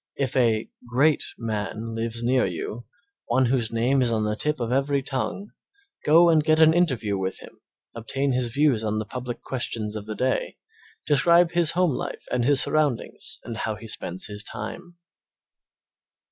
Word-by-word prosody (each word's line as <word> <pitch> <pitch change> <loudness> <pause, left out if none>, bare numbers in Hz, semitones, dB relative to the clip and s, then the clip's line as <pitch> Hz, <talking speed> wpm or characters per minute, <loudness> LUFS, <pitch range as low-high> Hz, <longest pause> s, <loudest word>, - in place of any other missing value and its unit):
If 135 -2 -2
a 115 -4 +2 0.2
"great" 140 +5 +3
man 110 0 -4
lives 115 +1 -3
near 125 +1 +3
you, 100 +6 -4 0.4
one 130 +2 +3
whose 120 -2 0
name 125 +4 +2
is 120 -2 +2
on 110 -1 +1
the 105 0 0
tip 150 +6 -1
of 120 -1 -2
every 135 +1 +1
tongue, 140 +10 -3 0.5
go 170 +3 +6
and 160 -2 +4
get 155 0 +3
an 160 0 +7
interview 125 - +1
with 95 0 -2
him, - - -14 0.3
obtain 135 +4 -2
his 125 -1 0
views 135 -4 +2
on 110 0 -1
the 110 - -2
public 125 +1 -6
questions 115 -4 -3
of 105 -1 -6
the 110 - -4
day, 130 - -1 0.5
describe 170 +4 +4
his 170 -2 +2
home 180 -3 +3
life - - -5
and 125 -1 +1
his 140 0 +4
surroundings 155 +3 -1
and 115 -2 -6
how 110 0 -2
he 115 - -11
spends 95 -4 -3
his 105 0 -4
time. 170 +13 -7
125 Hz, 175 wpm, -25 LUFS, 110-145 Hz, 0.5 s, an